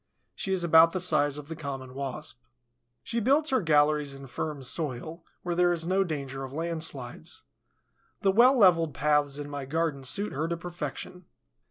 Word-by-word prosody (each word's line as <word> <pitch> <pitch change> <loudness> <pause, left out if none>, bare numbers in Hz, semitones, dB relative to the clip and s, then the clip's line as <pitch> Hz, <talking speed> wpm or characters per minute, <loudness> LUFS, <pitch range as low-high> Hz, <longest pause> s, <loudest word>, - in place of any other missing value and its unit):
She 190 - -4
is 185 -2 +1
about 165 0 +6
the 185 - -1
size 145 -5 +1
of 150 -1 -8
the 160 - -6
Common 135 -4 -6
Wasp. 135 -2 -6 0.6
She 235 - -2
builds 280 +7 +2
her 260 - +3
galleries 150 -3 +2
in 135 0 -10
firm 145 +2 -5
soil, 155 +4 -3 0.2
where 175 - -2
there 175 0 +3
is 165 -1 -1
no 190 +2 +2
danger 140 -5 -5
of 130 - -7
landslides. 155 - -4 0.8
The 195 - +3
well 250 +6 +6
leveled 165 - +4
paths 145 +1 +1
in 145 -1 -6
my 145 -2 -5
garden 155 -1 -1
suit 200 +10 -1
her 155 +4 -1
to 170 0 -2
perfection. 175 +1 -7
160 Hz, 175 wpm, -28 LUFS, 140-175 Hz, 0.8 s, about